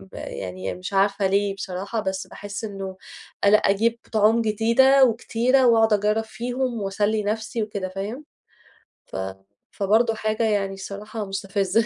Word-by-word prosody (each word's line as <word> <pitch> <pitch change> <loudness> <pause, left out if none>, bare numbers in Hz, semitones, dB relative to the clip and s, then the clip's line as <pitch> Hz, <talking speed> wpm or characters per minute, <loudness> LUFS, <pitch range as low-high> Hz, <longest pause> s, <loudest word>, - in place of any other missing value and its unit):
ب 95 0 -16
يعني 95 0 -5
مش 180 +2 -7
عارفة 195 0 +2
ليه 200 +1 +1
بصراحة، 195 +3 -4
بس 190 -2 -3
باحس 205 +2 -7
إنه 195 -3 -6 0.5
ال 200 +1 +6
أجيب 220 +3 +3
طُعوم 220 +2 +4
جديدة 230 +5 +4
وكتيرة، 245 +2 +2
وأقعد 225 -2 +5
أجرب 210 +2 +2
فيهم 245 +1 -3
وأسلي 205 +2 0
نفسي 220 +2 -2
وكده، 200 -3 -4
فاهم، 205 +10 -5 0.8
ف - - -12 0.6
فبرضو 220 +4 +2
حاجة 215 +1 -1
يعني 205 -3 +1
الصراحة 205 +3 -6
مستفزة. 195 +2 0
210 Hz, 135 wpm, -24 LUFS, 195-225 Hz, 0.8 s, ال